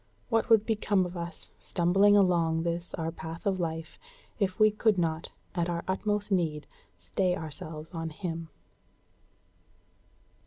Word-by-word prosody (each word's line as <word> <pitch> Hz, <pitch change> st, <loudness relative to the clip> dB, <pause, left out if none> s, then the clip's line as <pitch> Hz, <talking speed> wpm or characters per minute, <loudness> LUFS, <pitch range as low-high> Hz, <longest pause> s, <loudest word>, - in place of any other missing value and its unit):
What 225 Hz, 0 st, +1 dB
would 220 Hz, -2 st, +6 dB
become 205 Hz, -4 st, +2 dB
of 180 Hz, +1 st, -6 dB
us, 170 Hz, -1 st, -7 dB
stumbling 195 Hz, +4 st, +4 dB
along 170 Hz, -4 st, +3 dB
this 170 Hz, +1 st, -3 dB
our 165 Hz, -2 st, -2 dB
path 165 Hz, 0 st, -8 dB
of 195 Hz, -2 st, +1 dB
life, 165 Hz, -1 st, -4 dB, 0.4 s
if 190 Hz, -1 st, 0 dB
we 215 Hz, 0 st, +6 dB
could 215 Hz, -1 st, +2 dB
not, 165 Hz, -2 st, -1 dB, 0.2 s
at 175 Hz, -2 st, 0 dB
our 170 Hz, -1 st, -2 dB
utmost 205 Hz, +2 st, -1 dB
need, 160 Hz, -5 st, +1 dB, 0.3 s
stay 135 Hz, -, 0 dB
ourselves 155 Hz, +1 st, -7 dB
on 165 Hz, -1 st, -3 dB
Him? 165 Hz, 0 st, -5 dB
175 Hz, 140 wpm, -29 LUFS, 165-200 Hz, 0.4 s, would